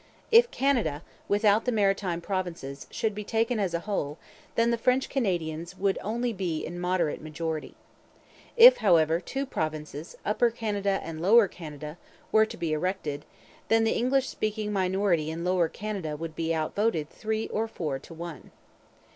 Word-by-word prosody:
If 470 +1 +7
Canada, 240 - 0 0.2
without 205 +1 +3
the 250 - +1
Maritime 195 -5 +1
Provinces, 170 -7 -4
should 220 -3 -1
be 210 +1 -5
taken 225 +2 0
as 185 -4 0
a 170 - -1
whole 170 -7 -3 0.4
then 230 +1 +3
the 235 - +1
French 255 +3 +2
Canadians 175 - -2
would 195 0 +1
only 235 +3 -1
be 180 -5 -2
in 175 - -6
a - - -5
moderate 180 -3 0
majority. 155 0 -4 0.8
If, - - +10
however, 165 - +4
two 270 +9 -4
provinces, 155 - -4
Upper 225 +3 +3
Canada 205 -4 -1
and 160 -1 -6
Lower 210 +4 +6
Canada, 155 -2 -9 0.3
were 220 0 +5
to - - -9
be 165 -2 -1
erected, 155 -3 -2 0.4
then 225 0 +4
the 225 - +2
English 260 +2 +2
speaking 215 -1 -2
minority 185 -4 +1
in 165 +2 -4
Lower 180 -2 +2
Canada 190 -8 -4
would 160 0 -6
be 165 0 -1
outvoted 160 +1 0
three 220 0 -2
or 225 +1 -1
four 150 -10 -3
to 165 - -13
one. 170 -1 -8
185 Hz, 165 wpm, -27 LUFS, 160-220 Hz, 0.8 s, If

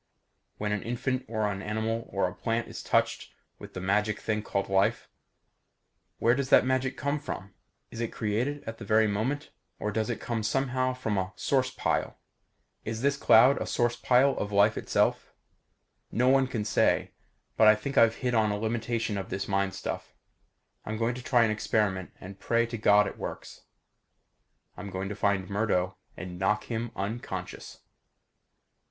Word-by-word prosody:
When 105 0 -2
an 105 -1 -1
infant 130 +2 -2
or 110 -1 -1
an 100 -2 -2
animal 110 +2 -2
or 100 -2 +1
a 90 - -6
plant 115 +5 -2
is - - -7
touched - - 0 0.2
with - - -11
the - - -3
magic 105 +3 0
thing 105 -1 -1
called 100 -2 -2
life 95 0 +1 1.1
where 120 - +3
does 135 0 -1
that - - +6
magic 130 0 0
come 140 +1 -1
from? 95 -7 -7 0.4
Is 115 - -6
it 115 - -2
created 120 +7 -2
at 115 0 -7
the - - -7
very 110 +2 +3
moment 115 +8 -2 0.3
or 105 - -2
does 110 +2 -1
it 120 - -2
come 115 -2 -3
somehow 130 +3 0
from 110 -6 -1
a 95 0 -3
source 130 +6 +1
pile? - - -1 0.7
Is 110 +2 -4
this 140 0 +3
cloud 125 0 +5
a - - -2
source 120 -1 +1
pile 125 +3 +4
of 105 - -3
life 100 +2 +4
itself? - - 0 0.8
No 125 +2 +2
one 135 0 +4
can 115 -4 -3
say. 105 - +2 0.4
But 110 - +5
I 110 - +8
think 135 +6 -5
I've 115 0 +5
hit 125 -1 -2
on 110 -2 +3
a 105 - -1
limitation 110 -1 -2
of 95 - -6
this 95 +1 -3
mind 100 0 0
stuff. - - -5 0.7
I'm 110 0 -4
going 115 +2 0
to 125 - -7
try 120 -1 +3
an 110 - +2
experiment 105 -3 0
and 95 +1 -10
pray 115 +2 +1
to 115 0 -5
God 105 0 +5
it - - -6
works. - - -7 1.1
I'm 100 - -7
going 95 +1 -4
to 105 - -4
find 100 -2 0
Murdo 95 -2 0 0.2
and 90 -1 -7
knock 105 +3 +1
him 115 +1 -3
unconscious. 105 +5 -5
110 Hz, 175 wpm, -28 LUFS, 100-120 Hz, 1.1 s, I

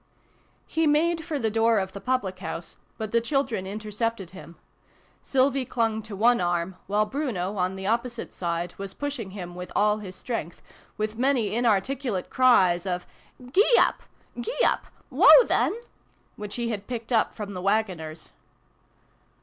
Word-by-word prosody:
HE 320 -1 0
made 325 +3 +2
for 320 -3 -3
the 225 -5 -1
door 225 +1 +3
of 190 -1 -1
the 200 - -8
public 210 -8 -1
house, 170 -2 -6 0.2
but 220 -2 -4
the 235 - +3
children 235 -6 -1
intercepted 215 -1 -3
him. 180 -2 -12 0.7
Sylvie 270 0 +2
clang 225 -3 -1
to 215 -1 -8
one 235 +2 +4
arm; 175 +1 -1
while 210 +2 +2
Bruno, 210 -7 -3
on 185 +1 0
the 190 0 -6
opposite 235 +3 -2
side, 170 0 -3
was 195 -1 -6
pushing 280 -8 -4
him 180 -3 -7
with 180 +1 -8
all 210 +1 +3
his 190 -3 -8
strength, 200 -9 -5 0.4
with 215 +1 -3
many 255 -5 +2
inarticulate 235 -1 0
cries 195 -8 +4
of 180 -1 -2 0.2
" 250 -1 -16
Gee 440 +5 +5
up! - - +3 0.4
Gee 475 - -4
back! - - +1 0.2
Woah - - +8
then! 450 - +1 0.3
" - - -39
which 205 -1 -7
he 235 -1 -2
had 205 -3 -4
picked 240 -1 -4
up 225 - +2
from 205 -2 -6
the 180 - -5
waggoners. 185 -6 -2
215 Hz, 165 wpm, -26 LUFS, 190-250 Hz, 0.7 s, Woah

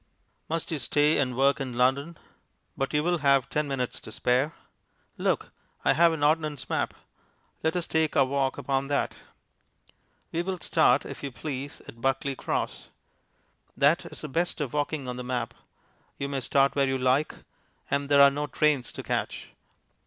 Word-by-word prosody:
Must 165 +1 -2
you 155 - -1
stay 145 +4 +2
and 125 -3 0
work 140 +1 +3
in 130 -3 -4
London? 140 +6 +1 0.6
But 135 - -2
you 150 0 +1
will 175 0 +1
have 140 -3 +3
ten 150 0 0
minutes 130 -3 -2
to - - -10
spare. 125 +7 +1 0.6
Look, - - -1 0.3
I - - +5
have 170 +1 +5
an 160 -3 -2
ordnance 150 -2 +1
map - - 0 0.7
let 160 +1 0
us 175 -1 0
take 160 -1 +1
our 135 - +6
walk 135 0 0
upon 135 0 -1
that. 145 0 0 1.2
We 165 - 0
will 185 +1 -3
start, 155 -6 +3
if - - -7
you 140 - -4
please, 140 +2 -6
at 115 - -12
Buckley 135 +1 0
Cross. - - -3 0.9
That 145 +4 +3
is - - -7
the 155 - -4
best 170 +6 -1
of 140 -5 -3
walking 145 -2 -1
on 125 0 -4
the 125 - -5
map; 120 -2 -2 0.6
you 140 - -2
may 140 -1 -2
start 135 +2 +2
where 140 -1 +3
you 135 0 0
like, 130 +4 +1 0.6
and 140 0 0
there 140 -1 +7
are 140 - +8
no 145 +1 -2
trains 145 -3 +1
to - - -7
catch. - - -3
140 Hz, 175 wpm, -27 LUFS, 130-150 Hz, 1.2 s, are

